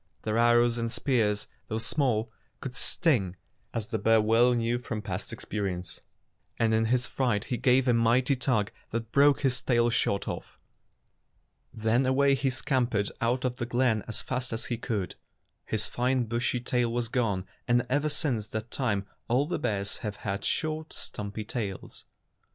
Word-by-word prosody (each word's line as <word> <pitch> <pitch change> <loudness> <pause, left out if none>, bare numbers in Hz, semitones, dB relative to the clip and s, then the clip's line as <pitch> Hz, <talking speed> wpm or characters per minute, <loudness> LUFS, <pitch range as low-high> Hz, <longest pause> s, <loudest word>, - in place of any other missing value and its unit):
Their 110 +1 0
arrows 120 0 +4
and 115 0 -2
spears, 110 -7 +1 0.2
though 110 - -2
small, 115 -3 +1 0.3
could 130 -2 -6
sting, 120 - +1 0.4
as 115 0 -3
the 110 -2 -1
bear 110 +2 +4
well 115 +3 +4
knew 120 +1 0
from 110 -3 -5
past 95 -1 -4
experience, 95 -3 -4 0.6
and 110 -1 +2
in 110 0 +3
his 125 +2 +2
fright 120 -6 0
he 125 - -2
gave 130 +1 +3
a 125 - +5
mighty 120 +4 +3
tug 125 -5 0 0.2
that 115 0 -4
broke 140 0 +5
his 130 -2 +1
tail 120 -1 +2
short 100 -3 0
off. - - -6 1.1
Then 110 +3 +1
away 140 +1 +4
he 135 0 0
scam 130 0 +1
pered 105 -3 0
out 125 +2 +1
of 125 -1 -1
the 120 - -2
glen 120 -3 +2
as 110 - -2
fast 125 -1 -3
as 115 0 -3
he 120 - -2
could 105 -8 -2
go. - - -12 0.5
His 110 -1 +1
fine 125 +1 +1
bushy 120 +2 -1
tail 120 -1 0
was 120 0 -1
gone, 110 -6 0 0.2
and 120 +1 +3
ever 145 +4 +1
since 135 -8 0
that 110 +2 -5
time 105 -7 0 0.2
all 125 +4 +2
the 170 - -2
bears 100 -4 -1
have 105 -2 -4
had 100 0 -2
short, 155 0 -2
stumpy 105 +1 -4
tails. 105 -4 -5
120 Hz, 175 wpm, -28 LUFS, 110-125 Hz, 1.1 s, a